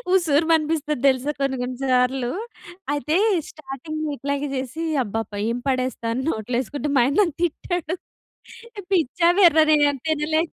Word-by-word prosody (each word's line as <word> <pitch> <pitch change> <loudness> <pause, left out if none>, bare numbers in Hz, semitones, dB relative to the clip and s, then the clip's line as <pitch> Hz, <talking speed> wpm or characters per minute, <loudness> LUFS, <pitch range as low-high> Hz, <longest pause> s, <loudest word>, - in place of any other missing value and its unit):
ఉసూరుమనిపిస్తది 315 -3 +1
దెలుసా 265 +2 +2
కొన్ని 275 -1 0
కొన్ని 250 0 -4
సార్లు. 250 -1 +1 0.6
అయితే, 300 +3 0 0.3
స్టార్టింగ్‌లో 310 +2 -6
ఇట్లాగే 280 +1 -2
జేసీ, 265 +5 -4 0.2
అబ్బబ్బా! 220 -1 -4
ఏం 235 - -1
పడేస్తా 255 -2 -2
అని 260 - -2
నోట్లో 220 -1 -3
యేసుకుంటే 285 +3 -3
మా - - +6
ఆయన 275 +3 0
నన్ను 335 -7 0
తిట్టాడు. 350 0 -2 1.0
పిచ్చా, 335 -1 +2
వెర్రా 320 -5 +7
నేనేం 290 -2 +4
తినలే... 315 0 +1
290 Hz, 130 wpm, -23 LUFS, 255-315 Hz, 1.0 s, వెర్రా